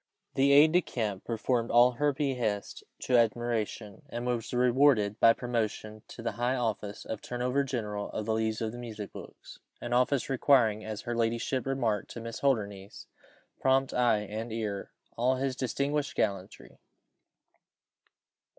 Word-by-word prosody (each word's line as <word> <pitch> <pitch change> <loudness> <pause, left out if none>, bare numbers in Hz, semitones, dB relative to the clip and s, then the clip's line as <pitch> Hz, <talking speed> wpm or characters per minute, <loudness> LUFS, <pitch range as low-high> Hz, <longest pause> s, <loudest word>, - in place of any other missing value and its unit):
The 135 +1 +3
aide 150 +3 +7
de 180 +2 +4
camp 105 - -4
performed 115 +1 -1
all 120 +1 +6
her 145 +4 +1
behests 125 -8 -2 0.2
to 125 - +3
admiration, 115 0 -1
and 120 -1 -5
was 120 -2 -2
rewarded 125 -4 +3
by 115 - +7
promotion 110 -3 -3
to 115 - -10
the 115 - -1
high 120 +2 -1
office 110 -4 -3
of 110 - -5
turner 125 0 -4
over 135 +3 +1
general 105 -6 -3
of 110 - -4
the 110 - 0
leaves 110 0 -1
of 110 -1 -1
the 120 - -8
music 110 -4 -7
books, - - -11 0.2
an 120 0 -4
office 125 +2 +2
requiring, 120 -5 +3
as 110 -1 -5
her 120 -1 -4
ladyship 115 +3 -1
remarked 120 -7 -1
to - - -7
Miss 115 0 -6
Holdernesse, 100 -7 -2 0.5
prompt 135 0 +2
eye 120 -4 +3
and 110 +3 -5
ear, 110 -3 -2
and - - -10 0.3
all 125 +2 +3
his 130 0 -2
distinguished 140 +3 -1
gallantry. 95 -3 -3
120 Hz, 160 wpm, -29 LUFS, 110-130 Hz, 0.5 s, aide